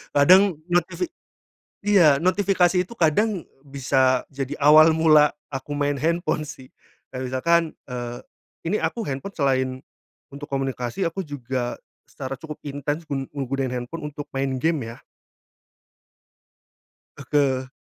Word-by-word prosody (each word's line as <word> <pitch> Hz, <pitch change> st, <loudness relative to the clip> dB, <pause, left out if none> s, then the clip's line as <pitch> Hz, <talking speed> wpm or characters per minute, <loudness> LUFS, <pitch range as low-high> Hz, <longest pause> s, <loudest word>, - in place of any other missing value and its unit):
Kadang 185 Hz, +5 st, +6 dB, 0.2 s
notifi 175 Hz, -, +1 dB, 0.8 s
iya 175 Hz, -9 st, +6 dB
notifikasi 185 Hz, +1 st, +2 dB
itu 230 Hz, +6 st, -8 dB
kadang 185 Hz, +3 st, +1 dB, 0.2 s
bisa 130 Hz, -2 st, +1 dB
jadi 140 Hz, +1 st, -4 dB
awal 155 Hz, +2 st, +7 dB
mula 155 Hz, -2 st, +6 dB, 0.2 s
aku 145 Hz, +2 st, -4 dB
main 145 Hz, 0 st, +1 dB
handphone 170 Hz, 0 st, 0 dB
sih. 145 Hz, -4 st, -10 dB, 0.4 s
Kayak 130 Hz, 0 st, -4 dB
misalkan, 170 Hz, +7 st, +3 dB, 0.2 s
eee, 120 Hz, -2 st, -5 dB, 0.5 s
ini 205 Hz, +6 st, +1 dB
aku 230 Hz, -3 st, -2 dB
handphone 140 Hz, +9 st, -5 dB
selain, 130 Hz, -2 st, +2 dB, 0.6 s
untuk 145 Hz, +1 st, -8 dB
komunikasi 135 Hz, +4 st, -2 dB
aku 165 Hz, +4 st, -2 dB
juga, 130 Hz, -5 st, -4 dB, 0.3 s
secara 135 Hz, -1 st, -6 dB
cukup 155 Hz, +1 st, -8 dB
intens 145 Hz, +3 st, -3 dB
gun 135 Hz, -3 st, -4 dB
menggunain 135 Hz, -1 st, -2 dB
handphone 125 Hz, +5 st, -5 dB
untuk 145 Hz, 0 st, -7 dB
main 135 Hz, 0 st, -1 dB
gim 160 Hz, +1 st, 0 dB
ya. 115 Hz, +1 st, -8 dB, 2.2 s
Oke. 135 Hz, -2 st, 0 dB
145 Hz, 120 wpm, -23 LUFS, 135-165 Hz, 2.2 s, awal